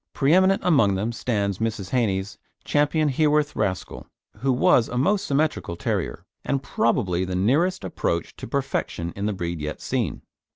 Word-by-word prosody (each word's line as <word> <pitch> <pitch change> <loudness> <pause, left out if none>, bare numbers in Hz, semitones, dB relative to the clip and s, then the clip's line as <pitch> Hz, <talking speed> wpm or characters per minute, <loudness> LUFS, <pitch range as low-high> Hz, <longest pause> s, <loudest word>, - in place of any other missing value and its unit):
Preeminent 185 +7 +3
among 125 - +4
them 105 +5 -1
stands 100 -5 -1
Mrs. 105 -4 -3
Hannay's 100 -6 0 0.3
Ch. - - -8
Heworth 150 0 +2
Rascal, 95 -4 -3 0.3
who 135 +1 0
was 125 -2 +4
a 125 - -3
most 195 +10 +1
symmetrical 145 - 0
terrier, - - -3 0.2
and 135 -1 -1
probably 105 -7 +1
the 90 0 -3
nearest 150 - +2
approach 85 -1 -2
to - - -7
perfection 115 -10 -2
in 100 +1 -2
the 105 - 0
breed 85 -3 -4
yet 75 0 -4
seen. - - -2
120 Hz, 155 wpm, -24 LUFS, 95-145 Hz, 0.3 s, among